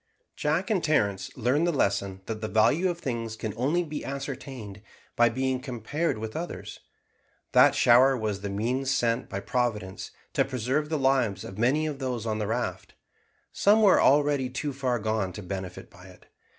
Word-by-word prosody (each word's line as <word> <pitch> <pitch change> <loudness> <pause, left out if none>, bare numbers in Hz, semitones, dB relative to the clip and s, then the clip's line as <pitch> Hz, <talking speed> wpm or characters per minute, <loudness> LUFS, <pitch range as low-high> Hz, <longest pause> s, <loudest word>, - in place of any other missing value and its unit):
Jack 165 +7 0
and 190 -5 +1
Terence 100 -11 +1
learned 130 +8 +2
the - - +2
lesson, 100 - 0
that 110 -1 -5
the 110 - -2
value 150 +13 +3
of 175 - -3
things 115 -7 -4
can 110 -1 -4
only 145 +10 +1
be 155 -2 -6
ascertained 135 -7 -6 0.3
by 120 0 +5
being 130 +2 -1
compared 130 +5 -2
with 110 0 -6
others. 170 +2 -6 0.7
That - - +6
shower 130 +3 +5
was 105 -3 -3
the 100 - -4
means 125 +7 -1
sent 120 -2 0
by 95 - -4
Providence 105 -2 -2 0.2
to - - +3
preserve 135 +4 -1
the 160 - 0
lives 130 -8 +1
of 95 - -9
many 135 +7 +2
of 150 -3 -4
those 125 -4 -3
on 110 -1 -1
the 105 - -2
raft. 110 -5 -3 0.6
Some 215 +2 +4
were 200 - +6
already 145 -2 +3
too 140 +3 -3
far 130 -2 -1
gone 110 -4 -1
to 105 - -8
benefit 95 -1 -6
by 95 -2 -15
it. 90 -1 -17
125 Hz, 175 wpm, -27 LUFS, 105-140 Hz, 0.7 s, That